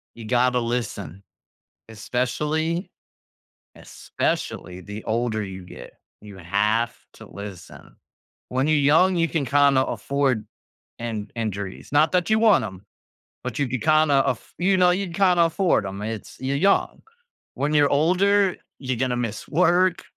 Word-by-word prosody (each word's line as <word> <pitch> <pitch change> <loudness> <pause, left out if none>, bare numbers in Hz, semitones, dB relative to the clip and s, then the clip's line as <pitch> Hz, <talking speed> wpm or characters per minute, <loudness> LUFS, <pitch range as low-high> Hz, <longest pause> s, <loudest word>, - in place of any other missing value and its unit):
You 115 - -10
gotta 125 +2 +2
listen. 110 -7 -4 0.7
Especially 150 - -2 0.9
especially 90 0 -4
the 105 +3 -8
older 110 -1 -1
you 95 -2 -8
get. - - -11 0.3
You 105 -2 -12
have 105 +6 0 0.2
to - - -12
listen. 100 -3 -11 0.5
When 130 +3 0
you're 155 - +3
young, 160 +6 +4
you 165 - +2
can 155 -3 -1
kinda 140 -1 +4
afford 135 -6 -1 0.5
an 110 -3 -5
injuries. 100 -4 -5
Not 150 +3 +4
that 180 +1 +1
you 220 0 +3
want 220 -2 +5
'em, 95 0 -10 0.6
but 125 -1 -5
you 140 - +1
could 125 -1 -3
kinda 155 -3 +4
af 125 - -3
you 190 +2 +2
know, 180 -1 +5
you 190 +2 -1
could 170 - -8
kinda 180 -3 +4
afford 165 - +1
'em. 95 +1 -6
It's 110 0 -6
you're 135 +1 -2
young. 195 +7 +1 0.5
When 145 +2 -1
you're 145 -1 +4
older, 185 +6 +3 0.2
you're 130 -2 -3
gonna 125 0 0
miss 120 -4 -4
work. 180 +2 +2
130 Hz, 145 wpm, -23 LUFS, 110-165 Hz, 0.9 s, want